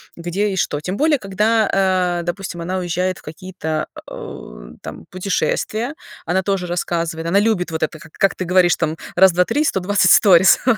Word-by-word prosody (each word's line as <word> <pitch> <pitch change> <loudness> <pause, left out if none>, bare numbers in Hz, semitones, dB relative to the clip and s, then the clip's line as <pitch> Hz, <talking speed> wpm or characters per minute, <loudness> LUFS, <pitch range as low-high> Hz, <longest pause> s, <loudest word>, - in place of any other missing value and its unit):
где 175 +5 -2
и 190 - -3
что. 145 -5 -1
Тем 180 +6 -4
более, 300 -1 +2
когда, 210 +2 +1
а, 185 -2 +1
допустим, 175 0 -5
она 185 +2 -2
уезжает 180 +1 -2
в - - -16
какие-то, 160 -1 -5
а, - - -9
о, - - -9
там, 75 +2 -9
путешествия, 215 +6 -2 0.3
она 180 +3 +1
тоже 190 -1 -1
рассказывает, 170 -1 -2
она 195 +4 +3
любит 210 -4 +1
вот 160 0 -2
это, 155 0 -3
как 160 -2 -15
как 195 - +2
ты 185 - -4
говоришь 180 -1 +4
там, 160 -1 -2 0.2
раз-два-три, 180 - +4
120 190 -2 +2
сторис. 190 -3 +6
Вот. 235 -4 +3
185 Hz, 180 wpm, -19 LUFS, 170-195 Hz, 0.3 s, сторис